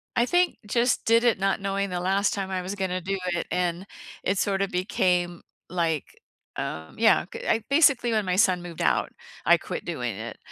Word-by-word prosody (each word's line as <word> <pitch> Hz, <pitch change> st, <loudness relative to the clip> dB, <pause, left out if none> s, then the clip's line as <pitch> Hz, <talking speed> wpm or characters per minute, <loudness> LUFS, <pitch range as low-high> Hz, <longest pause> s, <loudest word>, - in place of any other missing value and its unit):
I 240 Hz, -, +3 dB
think 355 Hz, +6 st, +2 dB
just 235 Hz, +4 st, +1 dB
did 230 Hz, +1 st, +4 dB
it 235 Hz, -5 st, +3 dB
not 195 Hz, 0 st, +1 dB
knowing 195 Hz, 0 st, -1 dB
the 180 Hz, -1 st, -2 dB
last 195 Hz, +3 st, +1 dB
time 195 Hz, -1 st, -3 dB
I 185 Hz, -1 st, -2 dB
was 185 Hz, +3 st, -5 dB
gonna 185 Hz, -2 st, -2 dB
do 195 Hz, +2 st, -2 dB, 0.2 s
it 170 Hz, -, -3 dB
and 180 Hz, +1 st, -1 dB, 0.4 s
it 195 Hz, +1 st, 0 dB
sorta 195 Hz, -1 st, +1 dB
became 180 Hz, -1 st, 0 dB, 0.3 s
like, 165 Hz, -4 st, 0 dB, 0.5 s
um, 80 Hz, 0 st, -5 dB
yeah, 220 Hz, -4 st, +4 dB
c -, -, -7 dB
I 220 Hz, 0 st, +2 dB
basically, 280 Hz, -5 st, +4 dB
when 215 Hz, -2 st, +1 dB
my 180 Hz, -1 st, 0 dB
son 185 Hz, -3 st, +3 dB
moved 170 Hz, -2 st, -7 dB
out, 70 Hz, -5 st, +1 dB, 0.3 s
I -, -, +6 dB
quit -, -, -6 dB
doing -, -, -3 dB
it -, -, -7 dB
195 Hz, 195 wpm, -26 LUFS, 180-215 Hz, 0.5 s, I